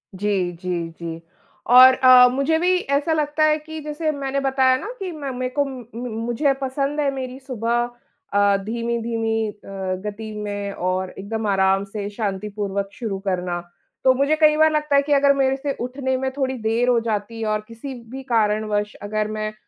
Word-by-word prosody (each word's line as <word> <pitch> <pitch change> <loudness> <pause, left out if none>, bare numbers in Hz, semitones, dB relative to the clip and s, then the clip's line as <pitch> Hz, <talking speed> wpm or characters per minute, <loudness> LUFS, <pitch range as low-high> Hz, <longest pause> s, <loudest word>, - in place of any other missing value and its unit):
जी, 190 -2 0
जी, 175 -1 -4
जी। 165 -1 -6 0.5
और 255 +1 +9
अ, 255 -1 +8
मुझे 275 +4 +1
भी 365 +2 +3
ऐसा 285 +1 0
लगता 305 0 0
है 305 0 +4
कि 315 +1 -8
जैसे 305 +1 -2
मैंने 275 -1 -2
बताया 265 -1 +3
ना 405 - -7
कि 375 -2 -4
मैं 290 -4 -5
मैं 255 0 -1
को 285 - +1
उम, 270 -2 -6 0.2
म 245 +2 -4 0.2
मुझे 255 +4 +1
पसंद 275 +2 -1
है 285 - +2
मेरी 260 -1 -5
सुबह, 240 -3 -1 0.5
अ, 200 0 +4
धीमी-धीमी 230 -1 -1
अ, 195 -2 -5
गति 215 +1 -5
में 205 -1 -4
और 185 +1 -2
एकदम 220 +3 -3
आराम 195 0 +3
से 200 0 -5
शांतिपूर्वक 200 -1 -3
शुरू 215 -6 -4
करना। 180 -2 -1 0.4
तो 260 - +6
मुझे 280 +4 +2
कई 305 -1 +6
बार 315 0 +5
लगता 300 -1 +1
है 280 - +6
कि 290 +1 0
अगर 280 0 +5
मेरे 270 -1 +2
से 280 +1 -3
उठने 260 +1 -2
में 265 0 -1
थोड़ी 265 -1 -2
देर 225 +2 0
हो 240 -2 +4
जाती 225 0 -3
है 220 - -1
और 215 0 0
किसी 230 +4 -8 0.2
भी 265 0 -7
कारणवश 210 -3 0
अगर 215 +1 -1
मैं 215 0 -3
235 Hz, 185 wpm, -22 LUFS, 205-275 Hz, 0.5 s, और